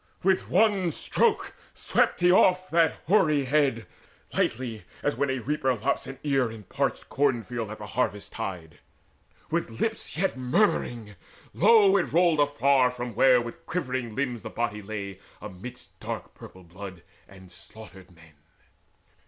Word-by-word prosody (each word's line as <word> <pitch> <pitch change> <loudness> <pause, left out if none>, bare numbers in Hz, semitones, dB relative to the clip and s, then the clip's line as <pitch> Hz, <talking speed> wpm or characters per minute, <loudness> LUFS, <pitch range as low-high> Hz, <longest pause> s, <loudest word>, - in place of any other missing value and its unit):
With 190 0 +2
one 200 -6 +3
stroke 435 - 0 0.2
swept - - +1
he 175 0 +5
off 185 0 +4
that 165 -1 +3
hoary 155 -7 +3
head 135 -5 +1 0.5
Lightly 115 -2 -1 0.2
as - - 0
when 140 +3 0
a 130 - 0
reaper 130 +1 0
lops 125 +5 -1
an 135 - -7
ear 135 -5 +1
In 110 -1 -9
a 100 - -22
parched - - -1
cornfield 120 -5 -1
at 110 - -7
the 105 - -8
harvest 105 -2 -2
tide. 85 -5 -6 0.7
With 115 - -2
lips 225 -6 -2
yet 190 -1 0
murmuring 125 - 0 0.4
low 205 0 +6
it 175 - -1
rolled 170 -2 +3
afar 140 -3 +3
From 125 -1 -6
where 125 +3 +5
with 120 +8 -7
quivering 130 -9 -3
limbs 125 -4 -2
the - - -7
body 105 -3 -3
lay 100 -2 -6 0.2
Amidst 105 +5 -10
dark - - -6
purple 95 - -13
blood 90 0 -10 0.2
and 95 -2 -15
slaughtered 95 0 -11
men. 85 -3 -19
125 Hz, 150 wpm, -27 LUFS, 105-155 Hz, 0.7 s, low